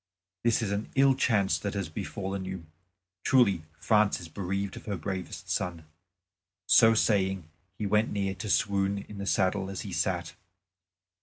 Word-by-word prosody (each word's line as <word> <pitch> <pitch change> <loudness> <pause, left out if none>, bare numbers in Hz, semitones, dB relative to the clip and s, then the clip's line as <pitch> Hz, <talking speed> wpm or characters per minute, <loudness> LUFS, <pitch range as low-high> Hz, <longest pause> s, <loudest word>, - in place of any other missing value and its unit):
"This 115 0 +2
is 100 - -1
an 100 +1 -2
ill 135 0 +5
chance 110 -7 +2
that 100 0 -4
has 100 -3 -2
befallen 95 +4 -4
you. 95 -3 -6 0.6
Truly 100 -11 +3
France 105 -1 +3
is 85 -3 -9
bereaved 100 +3 -3
of - - -11
her 100 -2 -2
bravest 95 +2 -5
son." 85 -3 -2 0.8
So 115 +3 +6
saying 95 -5 +1 0.3
he 105 - -3
went 105 +2 +2
near 100 -1 -1
to 110 +2 -6
swoon 100 0 +1
in 105 - -9
the 100 - -4
saddle 95 0 +1
as 95 - -5
he - - -6
sat. - - -1
100 Hz, 160 wpm, -29 LUFS, 95-105 Hz, 0.8 s, So